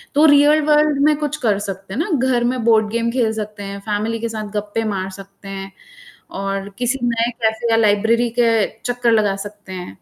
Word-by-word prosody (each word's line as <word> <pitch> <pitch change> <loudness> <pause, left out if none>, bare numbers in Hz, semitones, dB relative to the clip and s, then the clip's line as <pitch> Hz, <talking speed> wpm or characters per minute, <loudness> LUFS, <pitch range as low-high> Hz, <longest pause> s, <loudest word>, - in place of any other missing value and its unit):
तो 300 +2 +5
real 295 +1 +6
world 300 -1 +3
में 305 - +4
कुछ 300 -1 -3
कर 210 -4 +1
सकते 195 -1 -6
हैं 245 - -3
ना? 345 - -1 0.2
घर 245 -2 +2
में 245 -1 -1
बोर्ड 220 -2 +4
गेम 235 0 0
खेल 235 -3 +1
सकते 210 -1 -6
हैं, 200 0 -6
फ़ैमिली 215 +2 -2
के 230 - -3
साथ 215 -2 -5
गप्पे 210 +2 -2
मार 190 0 -3
सकते 195 0 -13
हैं 195 0 -6 0.7
और 195 0 -3
किसी 250 +2 -1
नए 235 0 +1
कैफे 220 +1 0
या - - +4
लाइब्रेरी 225 +2 +2
के 230 -3 +3 0.2
चक्कर 245 -1 +1
लगा 210 -3 +2
सकते 205 -2 -12
हैं। 180 - -8
225 Hz, 205 wpm, -19 LUFS, 205-245 Hz, 0.7 s, real